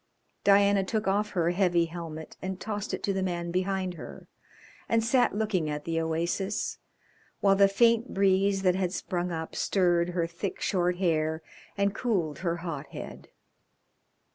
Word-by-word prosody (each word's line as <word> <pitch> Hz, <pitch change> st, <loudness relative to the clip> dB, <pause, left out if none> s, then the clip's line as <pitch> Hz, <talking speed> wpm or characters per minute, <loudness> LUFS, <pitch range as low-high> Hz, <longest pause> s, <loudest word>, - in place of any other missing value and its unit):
Diana 200 Hz, 0 st, +5 dB
took 215 Hz, +1 st, -2 dB
off 205 Hz, +2 st, +1 dB
her 170 Hz, 0 st, +3 dB
heavy 175 Hz, -2 st, +2 dB
helmet 165 Hz, -2 st, -7 dB
and 190 Hz, 0 st, -4 dB
tossed 205 Hz, -2 st, -4 dB
it -, -, -4 dB
to 200 Hz, -, +1 dB
the 190 Hz, -, -1 dB
man 175 Hz, -2 st, -2 dB
behind 185 Hz, 0 st, -1 dB
her, 170 Hz, -, -10 dB, 0.6 s
and 230 Hz, -1 st, +3 dB
sat 245 Hz, -1 st, +3 dB
looking 205 Hz, -7 st, 0 dB
at 150 Hz, 0 st, -4 dB
the 165 Hz, -1 st, 0 dB
oasis, 170 Hz, +5 st, -2 dB, 0.6 s
while 195 Hz, -1 st, +4 dB
the 200 Hz, 0 st, +6 dB
faint 230 Hz, +4 st, +3 dB
breeze 195 Hz, 0 st, +2 dB
that 185 Hz, -1 st, +4 dB
had 185 Hz, -1 st, -1 dB
sprung 180 Hz, -3 st, -2 dB
up 160 Hz, -1 st, -5 dB
stirred 175 Hz, -3 st, +2 dB
her 170 Hz, -, +2 dB
thick, 170 Hz, +4 st, -5 dB
short 180 Hz, -2 st, +1 dB
hair, 160 Hz, -3 st, 0 dB, 0.3 s
and 200 Hz, 0 st, +1 dB
cooled 190 Hz, -10 st, -1 dB
her 170 Hz, -1 st, -1 dB
hot 150 Hz, -4 st, -4 dB
head. -, -, -9 dB
185 Hz, 160 wpm, -28 LUFS, 170-200 Hz, 0.6 s, the